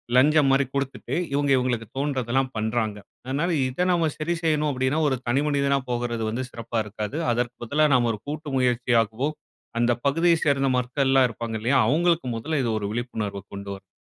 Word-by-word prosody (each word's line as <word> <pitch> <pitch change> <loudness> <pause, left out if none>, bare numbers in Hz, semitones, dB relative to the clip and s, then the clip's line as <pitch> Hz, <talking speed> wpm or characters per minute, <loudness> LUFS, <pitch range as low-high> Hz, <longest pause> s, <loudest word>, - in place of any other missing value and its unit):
லஞ்சம் 145 +3 +5
மாரி 135 +1 +3
கொடுத்துட்டு, 140 -1 -3 0.2
இவுங்க 145 0 +1
இவுங்களுக்கு 120 -3 -1
தோன்றுவதெல்லாம் 135 -2 0
பண்றாங்க. 110 -1 -1 0.3
அதனால 140 +7 -1 0.2
இத 130 +8 -1
நாம 170 -3 +2
சரி 155 +3 -1
செய்யணும் 150 -2 +2
அப்படின்னா, 130 +3 0
ஒரு 130 - 0
தனிமனிதனா 140 +2 +2
போகுறது 120 -1 -2
வந்து 120 +4 -2
சிறப்பா 115 -1 -4
இருக்காது. 105 +6 -5
அதற்கு 120 +1 -1
பதிலா 145 +6 +2
நாம 120 -2 +3
ஒரு 105 - -6
கூட்டு 150 0 -5
முயற்சியாகவோ! 120 0 +1 0.5
அந்த 120 +1 +3
பகுதியை 165 +4 +3
சேர்ந்த 135 -2 +2
மக்கள் 125 +2 0
எல்லாம் 135 -1 +5
இருப்பாங்க 115 0 -5
இல்லயா! 125 +5 +2
அவுங்களுக்கு 165 +2 +2
முதல்ல 145 +6 -1
இது 115 - 0
ஒரு 105 - -3
விழிப்புணர்வு 110 -4 -3
கொண்டு 100 0 -7
வரணும்." 95 -1 -16
130 Hz, 165 wpm, -25 LUFS, 115-145 Hz, 0.5 s, லஞ்சம்